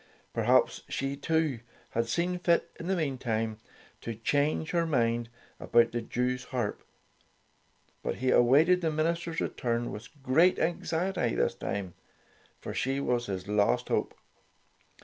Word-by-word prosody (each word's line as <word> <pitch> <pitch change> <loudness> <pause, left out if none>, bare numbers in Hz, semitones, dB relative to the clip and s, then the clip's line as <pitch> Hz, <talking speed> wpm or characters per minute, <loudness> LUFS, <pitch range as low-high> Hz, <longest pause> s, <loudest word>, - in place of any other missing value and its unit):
Perhaps - - +3
she, 135 +1 -2
too, 155 -3 0 0.3
had 115 0 0
seen 175 +8 0
fit, 170 -1 +2
in 165 - -6
the 190 - +1
meantime, 115 -8 -2 0.4
to 115 - -5
change 145 +7 0
her 170 -1 +1
mind 120 -5 +1 0.3
about 120 0 +3
the 120 - -2
Jewsharp. 125 -1 -2 1.2
But - - -2
he 130 0 0
awaited 155 +9 +5
the 165 - +1
minister's 165 +2 -1
return 120 -1 -1
with 105 +4 -8
great 160 +8 +4
anxiety 170 -3 0
this - - +1
time, 95 -3 -4 0.7
for - - -6
she 135 +1 -1
was 120 -3 0
his 95 -1 -4
last 105 0 +2
hope. - - 0
130 Hz, 130 wpm, -29 LUFS, 115-165 Hz, 1.2 s, awaited